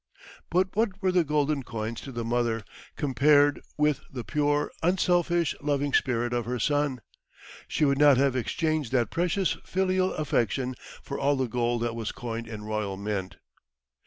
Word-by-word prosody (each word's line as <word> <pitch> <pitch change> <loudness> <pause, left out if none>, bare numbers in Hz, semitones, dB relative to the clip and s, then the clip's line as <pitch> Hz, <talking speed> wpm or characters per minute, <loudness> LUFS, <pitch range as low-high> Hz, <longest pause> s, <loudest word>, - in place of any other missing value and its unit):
But 185 +2 +1
what 210 -3 0
were 185 - +3
the 180 -1 +3
golden 150 -1 +1
coins 115 -2 -5
to 135 - -8
the 120 -2 -4
mother, 115 -1 0 0.3
compared 145 +1 +3 0.2
with 150 -2 +2
the 125 -3 -5
pure, 145 +6 0
unselfish, 175 -1 +2
loving 145 -1 0
spirit 120 -2 +1
of 120 -2 -1
her 125 +1 -2
son? 145 0 0 0.7
She 150 - +1
would 140 -1 +2
not 145 -3 +7
have 135 -1 +2
exchanged 155 +1 -1
that 120 -3 +2
precious 180 +2 0
filial 185 0 +1
affection 130 -3 0 0.3
for 140 - -5
all 140 +1 +2
the 130 -2 0
gold 120 0 0
that 115 -1 -2
was 115 -2 -3
coined 115 -1 -5
in 110 -2 -7
royal 105 -2 -3
mint. 100 -2 -3
140 Hz, 160 wpm, -27 LUFS, 120-150 Hz, 0.7 s, not